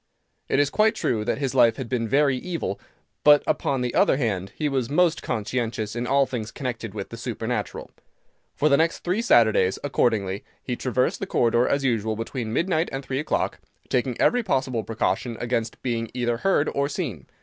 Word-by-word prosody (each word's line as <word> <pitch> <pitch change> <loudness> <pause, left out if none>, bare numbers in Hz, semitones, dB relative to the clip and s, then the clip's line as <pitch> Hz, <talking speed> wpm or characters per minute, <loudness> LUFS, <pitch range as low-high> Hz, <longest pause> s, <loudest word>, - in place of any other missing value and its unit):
It - - +2
is 145 0 +2
quite 215 0 +3
true 110 -3 0
that - - 0
his 135 -2 -2
life 120 -3 +5
had 130 - -5
been 115 -2 -1
very 140 +2 +3
evil, 165 - -4 0.4
but, 145 0 +7
upon 135 -2 0
the 125 -1 -2
other - - +4
hand, 100 -8 -2
he 150 - -1
was 130 -4 -1
most 165 +2 +2
conscientious 110 0 -2
in 120 +1 -2
all 140 +1 +4
things 115 -4 -4
connected 115 -5 -5
with 100 -2 -5
the 115 - -8
supernatural. 115 0 -4 0.6
For 150 - +2
the 140 -2 +5
next 165 +1 +1
three 185 +6 0
Saturdays, 110 - +4
accordingly, 105 -8 0 0.2
he 125 - -2
traversed 125 0 0
the - - -4
corridor 120 +1 +2
as 140 0 +1
usual 110 -4 0
between 115 +1 -4
midnight 165 +5 +1
and 135 0 -5
three 130 0 -2
o'clock, 150 - -1 0.3
taking 125 -1 0
every 245 - +3
possible 130 - -1
precaution 115 +1 -1
against 115 -2 -2
being 115 -3 -2
either 120 -2 0
heard 155 0 +2
or 140 0 0
seen. 125 - -4
125 Hz, 185 wpm, -24 LUFS, 115-140 Hz, 0.6 s, but